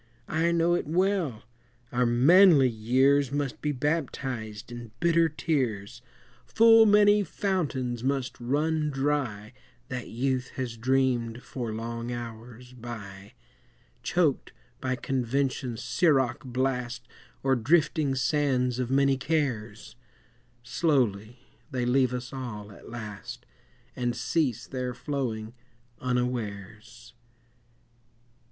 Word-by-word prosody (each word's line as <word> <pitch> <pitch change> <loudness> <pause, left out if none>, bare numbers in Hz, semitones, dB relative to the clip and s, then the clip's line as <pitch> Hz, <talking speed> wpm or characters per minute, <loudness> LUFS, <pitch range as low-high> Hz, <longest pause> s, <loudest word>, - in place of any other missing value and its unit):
I 165 +2 +2
know 170 0 +2
it 175 - -1
well, 175 - 0 0.5
our 125 0 +2
manly 145 +4 +6
years 130 +5 +2
Must 145 -2 -2
be 150 - 0
baptized 125 -6 -3
in 120 -1 -8
bitter 170 -1 +3
tears; 120 -8 -2 0.5
Full 225 0 +6
many 205 0 +5
fountains 140 - -2
must 135 -1 -1
run 150 +5 0
dry 135 -7 -2 0.4
That 125 -1 -5
youth 130 +1 -2
has 125 -3 -3
dreamed 125 -1 0
for 120 -4 -5
long 115 +2 -4
hours 120 +1 -8
by, 105 -5 -9 0.7
Choked 160 -3 0 0.3
by 130 0 -1
convention's 130 -1 -2
siroc 130 +1 +2
blast 125 -1 -2 0.4
Or 135 0 +3
drifting 150 +2 +2
sands 130 -2 +1
of 125 -1 -1
many 135 0 +3
cares; 125 -8 -2 0.7
Slowly 120 - 0 0.3
they 125 -3 -2
leave 130 0 +3
us 125 0 -5
all 105 -6 -6
at - - -13
last, 115 +1 -8 0.5
And 120 -1 -1
cease 125 +1 0
their 125 -2 -4
flowing 115 -6 -3 0.5
unawares. 120 -1 -4
125 Hz, 105 wpm, -27 LUFS, 120-145 Hz, 0.7 s, manly